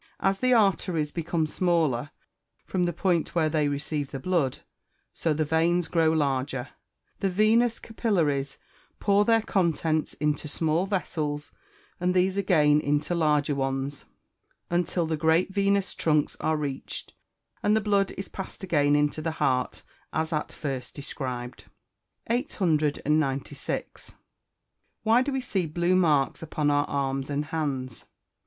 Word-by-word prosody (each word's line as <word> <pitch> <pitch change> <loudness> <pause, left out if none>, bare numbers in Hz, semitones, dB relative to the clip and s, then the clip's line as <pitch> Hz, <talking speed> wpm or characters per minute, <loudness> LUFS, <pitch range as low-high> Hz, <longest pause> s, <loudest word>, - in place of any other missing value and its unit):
As 195 0 +1
the 255 0 +2
arteries 185 -8 +2
become 165 0 -1
smaller 155 -6 +1 0.6
from 180 -2 0
the 175 - 0
point 175 0 0
where 160 -2 +3
they 150 -2 +1
receive 145 0 -2
the - - -5
blood, 165 -5 0 0.6
so 165 - -1
the 155 +1 +1
veins 165 +3 +2
grow 165 -2 +3
larger; 135 -4 -1 0.5
the 195 - +1
venous 220 +5 +3
capillaries, 160 - -1 0.4
pour 200 0 +3
their 225 0 +3
contents 165 -6 0
into 150 +1 -1
small 160 +4 0
vessels, 150 -6 -2 0.5
and 180 +1 +1
these 185 +1 +3
again 155 -7 +4
into 145 +4 0
larger 150 -3 +2
ones, 135 0 -2 0.7
until 175 0 +1
the 160 0 -1
great 160 +4 +2
venous 200 -1 +1
trunks 150 -2 +1
are 160 0 +1
reached, 140 -3 -5 0.5
and 210 - +3
the - - +4
blood 200 -2 +2
is 195 - -5
passed 190 0 -8
again 145 -5 +3
into 150 +1 +1
the 160 0 -2
heart 125 -1 0 0.3
as 160 +1 -1
at 150 - -2
first 135 -4 -5
described. 130 -4 -5 0.6
(Fig. 245 +5 0
50.) 160 -6 +1
896. 140 -1 -2 0.9
_Why 230 +3 +5
do 285 - -2
we 265 -1 -1
see 190 -8 -1
blue 170 +4 +1
marks 150 -7 +2
upon 150 -2 0
our 145 0 +2
arms 135 0 -1
and 145 +1 -1
hands? 140 -6 -3
160 Hz, 140 wpm, -27 LUFS, 145-185 Hz, 0.9 s, Why